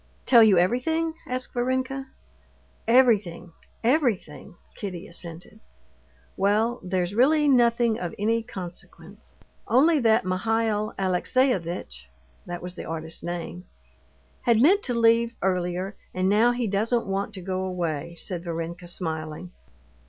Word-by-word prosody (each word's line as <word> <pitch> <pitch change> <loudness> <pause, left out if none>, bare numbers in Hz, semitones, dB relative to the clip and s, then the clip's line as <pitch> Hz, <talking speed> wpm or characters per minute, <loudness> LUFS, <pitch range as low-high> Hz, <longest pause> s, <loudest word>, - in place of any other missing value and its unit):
"Tell 240 -3 +7
you 210 -4 +6
everything?" 315 - +1
asked 255 0 -3
Varenka. 260 +2 -1 0.8
"Everything, 210 -8 +3 0.3
everything!" 235 - 0 0.2
Kitty 180 -5 -6
assented. 170 +4 -8 0.8
"Well, 215 +5 +1
there's 180 0 -2
really 295 +6 +4
nothing 235 -3 +3
of 175 -2 -5
any 225 +3 +1
consequence; 190 -2 -10 0.3
only 300 +6 +4
that 225 -4 +3
Mihail 215 +3 0
Alexeyevitch" 180 - 0 0.4
(that 175 0 -6
was 180 0 -6
the - - -6
artist's 160 0 -3
name) 175 +1 -6 0.8
"had 235 -2 +3
meant 370 - +5
to 245 - -1
leave 230 0 +3
earlier, 185 +1 -1 0.2
and 185 0 +1
now 215 +5 +4
he 245 0 -2
doesn't 220 +4 0
want 195 +2 -2
to 190 - -7
go 185 +1 -3
away," 170 -3 -3
said 175 -1 -5
Varenka, 170 +1 -5
smiling. 160 0 -5
200 Hz, 125 wpm, -25 LUFS, 175-240 Hz, 0.8 s, Tell